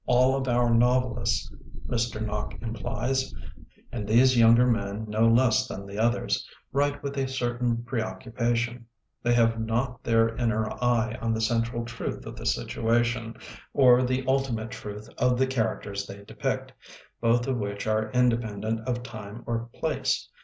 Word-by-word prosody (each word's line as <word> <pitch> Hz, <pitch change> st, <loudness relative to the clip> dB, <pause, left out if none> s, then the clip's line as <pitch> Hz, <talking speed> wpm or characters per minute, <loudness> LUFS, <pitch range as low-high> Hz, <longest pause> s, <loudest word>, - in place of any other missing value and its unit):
All 130 Hz, +2 st, +4 dB
of 135 Hz, -1 st, -2 dB
our 120 Hz, -1 st, +3 dB
novel 125 Hz, +2 st, +3 dB
ists, -, -, -1 dB, 0.3 s
Mr. 115 Hz, -2 st, -1 dB
Nock 105 Hz, 0 st, -4 dB
implies 130 Hz, +3 st, -2 dB, 0.3 s
— -, -, -28 dB
^and 105 Hz, -4 st, -4 dB
these 125 Hz, +4 st, +5 dB
younger 115 Hz, +1 st, +6 dB
men 110 Hz, -3 st, -1 dB
no 110 Hz, +2 st, +2 dB
less 125 Hz, +2 st, +4 dB
than 100 Hz, -4 st, -6 dB
the 100 Hz, +1 st, -7 dB
others 120 Hz, +2 st, 0 dB
— -, -, -40 dB
write 145 Hz, +1 st, +1 dB
with 140 Hz, 0 st, -3 dB
a 135 Hz, -, 0 dB
certain 120 Hz, -2 st, -1 dB
preoccupation; 120 Hz, 0 st, -2 dB, 0.3 s
they 120 Hz, 0 st, +2 dB
have 115 Hz, -1 st, +3 dB
not 120 Hz, +2 st, -2 dB
their 115 Hz, 0 st, +3 dB
inner 110 Hz, -2 st, +1 dB, 0.2 s
eye 120 Hz, -1 st, +1 dB
on 115 Hz, 0 st, 0 dB
the -, -, -2 dB
central 115 Hz, +1 st, 0 dB
truth 120 Hz, 0 st, -5 dB
of -, -, -7 dB
the -, -, -5 dB
situation 115 Hz, -, 0 dB, 0.4 s
or 125 Hz, -3 st, +6 dB
the 130 Hz, +1 st, 0 dB
ultimate 130 Hz, -4 st, 0 dB
truth 105 Hz, -2 st, -7 dB
of 125 Hz, 0 st, +3 dB
the 130 Hz, -, +3 dB
characters 110 Hz, -5 st, -2 dB
they 100 Hz, +1 st, -9 dB
depict, -, -, -3 dB, 0.5 s
both 120 Hz, +1 st, +3 dB
of 130 Hz, -3 st, -1 dB
which 100 Hz, -1 st, -4 dB
are 110 Hz, 0 st, 0 dB
independent 115 Hz, -3 st, +1 dB
of 120 Hz, -1 st, -1 dB
time 110 Hz, -2 st, -8 dB
or 115 Hz, 0 st, -3 dB
place. -, -, -1 dB
120 Hz, 160 wpm, -27 LUFS, 110-125 Hz, 0.5 s, younger